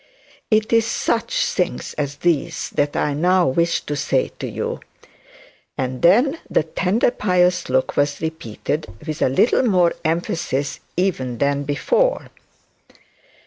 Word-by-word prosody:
It 215 +1 +2
is 230 -1 +4
such 230 0 0
things 180 -2 -2
as 145 -1 -3
these, 165 -3 -1
that 145 0 0
I 145 - 0
now 180 +4 +3
wish 170 +5 +1
to 145 - -4
say 485 - 0
to - - -4
you;' 470 +1 -4 1.0
and 130 -2 -3
then 250 - +4
the - - +2
tender 185 +9 +1
pious 180 - +1
look 130 0 +1
was 145 0 +1
repeated, 155 -1 -4 0.2
with 155 0 -5
a - - +3
little 135 - +3
more 180 -8 +3
emphasis 160 -4 -1 0.2
even 135 -10 -1
than 140 +1 0
before. - - 0
170 Hz, 135 wpm, -21 LUFS, 145-200 Hz, 1.0 s, is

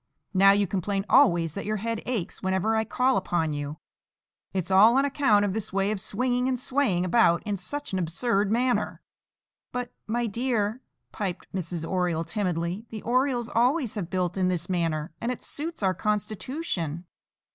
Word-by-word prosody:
Now 195 +1 +6
you 200 0 +3
complain 195 +1 -2
always 170 - +4
that 200 - -5
your 215 - 0
head 230 +2 -3
aches 230 -9 -3
whenever 190 +4 +1
I 220 0 +1
call 250 0 +2
upon 170 -4 0
you. 145 +1 -4 0.7
It's 190 -1 -2
all 215 +6 +7
on 275 - +4
account 275 -8 +3
of 195 - -1
this 220 -1 -4
way 195 +1 +1
of 205 -3 -3
swinging 250 +4 0
and 260 -1 0
swaying 250 -8 0
about 175 -3 +3
in 210 -2 -2
such 290 +8 -4
an 190 - +1
absurd 195 +4 0
manner." 245 +2 0 0.7
"But, 250 -1 -4 0.2
my 240 +2 0
dear," 230 0 -1 0.3
piped 195 -5 -5
Mrs. 170 -3 -3
Oriole 180 -3 0
timidly, 180 +2 -2
"the 220 -2 -7
Orioles 250 -1 +1
always 250 +1 +2
have 185 -5 -4
built 180 -1 -1
in 185 -1 +2
this 175 -2 -1
manner, 165 -3 -1
and 235 - -1
it 250 - -6
suits 320 -5 -2
our 190 -1 +3
constitution." 205 - -2
205 Hz, 170 wpm, -26 LUFS, 180-240 Hz, 0.7 s, all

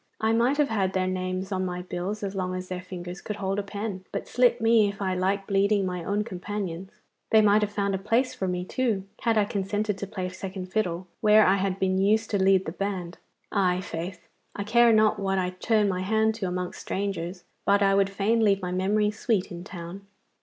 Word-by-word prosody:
I 220 +1 +2
might 240 +5 +2
have 295 -2 +2
had 195 -3 0
their 185 -1 +1
names 185 +1 -3
on 185 -1 0
my 180 -1 -3
bills 185 +4 -4
as 195 -1 -3
long 185 -2 -2
as 185 0 -6
their 180 -1 -4
fingers 180 0 -7
could 210 - -4
hold 195 -1 -2
a - - +1
pen, 200 -1 -5
but - - -4
slit 245 -1 +3
me 225 -2 +4
if 200 - -8
I 190 -2 0
like 195 +2 0
bleeding 200 0 +2
my 180 -2 -3
own 205 +4 0
companions. 190 -2 -5 0.4
They 220 - +6
might 210 0 +5
have 210 -1 -1
found 200 -1 -1
a 190 - -1
place 230 +6 +1
for 190 - -3
me, 180 0 -2
too, 225 -3 -1 0.2
had 230 -2 +2
I 210 - +4
consented 205 -1 -2
to 200 - -4
play 185 -2 -4
second 185 0 -7
fiddle 185 -4 -1
where 215 0 +6
I 195 +1 +4
had 195 -1 -1
been 190 -1 +1
used 215 +3 +2
to 200 -2 +1
lead 190 0 +4
the 160 - -3
band. 185 -2 -4 0.3
I' 185 -3 +2
faith, 180 -1 -6 0.3
I 200 - -3
care 235 +3 +5
not 215 -1 +4
what 195 -1 0
I 180 -1 0
turn 210 +3 +1
my 185 -2 -1
hand 220 +3 +2
to 210 -4 -3
amongst 180 0 -4
strangers, 180 -2 -3 0.2
but 200 0 +3
I 195 0 +4
would 195 0 +3
fain 210 +4 +1
leave 200 -2 +4
my 180 -2 -4
memory 205 +3 +1
sweet 210 -2 -1
in 175 0 -7
town. 185 +1 -9
195 Hz, 225 wpm, -26 LUFS, 185-210 Hz, 0.4 s, They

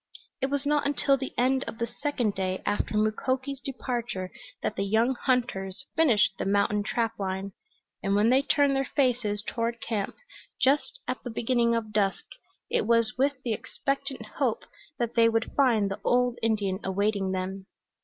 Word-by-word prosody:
It 265 - +2
was 280 0 -2
not 295 0 +2
until 280 -1 +3
the 265 0 -4
end 260 +2 +2
of - - -6
the 235 - 0
second 245 -3 -1
day 185 -1 -2
after 210 +1 0
Mukoki's 260 +5 0
departure 240 -8 -3 0.3
that - - -1
the 195 - -1
young 220 +6 +2
hunters 240 -5 -1
finished 275 -12 +4
the - - -1
mountain 205 +1 +2
trap 225 +1 -1
line, 190 0 -3 0.5
and 195 -1 +1
when 210 +3 +4
they 265 +1 +5
turned 280 -1 +3
their 270 -1 0
faces 240 -7 +1
toward 235 0 -2
camp 215 -4 -2 0.4
just 290 - +2
at - - -3
the 245 - -5
beginning 235 0 +1
of 220 -2 -3
dusk 200 -2 +1 0.4
it - - 0
was 230 -2 +3
with 275 0 0
the 235 - 0
expectant 275 0 -3
hope 250 -6 +1 0.3
that 235 -1 -1
they 230 -1 +5
would 225 0 -1
find 225 -8 +3
the 200 +1 -5
old 245 0 +2
Indian 205 -4 0
awaiting 200 0 0
them. 190 +1 -4
230 Hz, 170 wpm, -28 LUFS, 205-260 Hz, 0.5 s, they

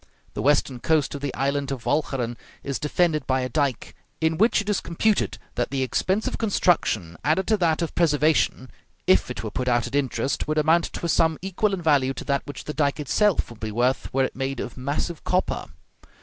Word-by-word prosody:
The - - -3
western 140 -3 +2
coast 155 +1 +1
of 140 - -6
the 140 -2 -2
island 140 +1 -1
of 130 -4 -5
Walcheren 135 -5 0 0.3
is 140 -4 -3
defended 155 -1 +1
by 130 0 +1
a 125 - -2
dike, 135 -1 -1 0.2
in 160 0 0
which 225 +4 +4
it 205 - -4
is 210 -2 +1
computed 205 +5 0 0.2
that 120 - -1
the 135 -1 -1
expense 190 - 0
of - - -3
construction 165 - +1
added 160 +6 +2
to 215 - +4
that 170 -3 +1
of 165 - -4
preservation, 150 -5 +2 0.3
if - - +4
it - - -5
were - - -4
put 125 - -3
out 120 -1 +2
at 120 - -7
interest, 140 -1 -1
would 155 0 -1
amount 160 +3 +4
to - - -6
a - - +1
sum 160 -1 +2
equal 195 +2 0
in 190 -3 -3
value 135 -4 +3
to - - -7
that 140 -1 +1
which 145 - -7
the 150 - -5
dike 145 -1 0
itself 185 - +1
would 115 - -12
be 110 0 -4
worth 125 +4 0
were 135 0 +2
it - - -2
made 135 -1 -3
of 120 - -5
massive 145 +5 -3
copper. 185 +1 0
145 Hz, 215 wpm, -24 LUFS, 130-170 Hz, 0.3 s, which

